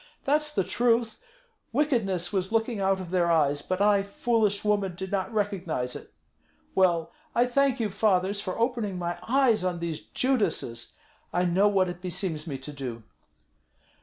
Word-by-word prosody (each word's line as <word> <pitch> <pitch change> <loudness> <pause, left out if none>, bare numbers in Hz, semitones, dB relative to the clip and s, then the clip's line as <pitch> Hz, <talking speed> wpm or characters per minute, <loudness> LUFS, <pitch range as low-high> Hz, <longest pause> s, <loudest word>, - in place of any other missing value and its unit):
That's 300 +2 +1
the 195 - +1
truth! 230 +2 +1 0.5
Wickedness 220 - +1
was 190 0 0
looking 225 -1 0
out 195 0 +2
of 180 -2 -7
their 175 -2 +2
eyes; 145 -3 +2
but 185 +5 -2
I, 205 -1 +4
foolish 205 0 0
woman, 200 -3 +1
did 190 +1 -6
not 190 +1 -1
recognize 185 - -2
it. - - -10 0.6
Well, 175 -3 +2 0.2
I 240 - +4
thank 270 +1 +2
you, 215 -3 -1
fathers, 195 0 +1
for 185 -2 -4
opening 230 -5 -1
my 175 0 -3
eyes 245 -5 +3
on 180 -1 -1
these 170 -2 -3
Judases. 200 - -1 0.4
I 180 +1 +1
know 185 +4 +3
what 195 -2 +3
it 175 0 -6
beseems 175 -3 -3
me 140 -4 -3
to 135 +3 -9
do." 125 -5 -6
195 Hz, 165 wpm, -27 LUFS, 175-225 Hz, 0.6 s, I